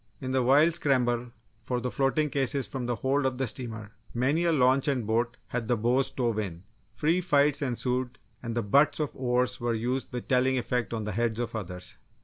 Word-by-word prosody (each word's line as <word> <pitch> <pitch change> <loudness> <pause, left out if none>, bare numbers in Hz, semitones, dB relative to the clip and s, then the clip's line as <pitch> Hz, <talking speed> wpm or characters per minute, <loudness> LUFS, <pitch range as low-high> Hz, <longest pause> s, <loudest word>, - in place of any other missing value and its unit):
In 130 - -4
the 130 0 +2
wild 145 +7 +5
scramble 125 -5 +1 0.3
for 125 +2 -2
the 125 0 -3
floating 140 +2 +1
cases 135 -2 0
from 125 +2 -5
the 120 - 0
hold 135 +4 0
of 130 -1 0
the 135 - 0
steamer, 115 -3 -5 0.2
many 140 +8 +1
a 170 - +3
launch 135 -2 +3
and 130 -5 0
boat 115 +2 0
had 120 -2 -3
the 120 - +2
bows 125 +5 +2
stove 120 -4 -1
in. 90 -4 -5 0.3
Free 160 +10 +1
fights 145 -4 +2
ensued 125 -1 -2 0.2
and 115 -1 -4
the 120 - +1
butts 140 +11 +3
of 150 -2 -2
oars 125 0 0
were 120 -1 0
used 125 +4 -2
with 125 -1 -5
telling 130 0 +2
effect 125 -1 -1
on 115 -2 -3
the 105 - -3
heads 115 +1 -1
of 120 -1 -3
others. 90 -4 -7
125 Hz, 205 wpm, -28 LUFS, 115-135 Hz, 0.3 s, wild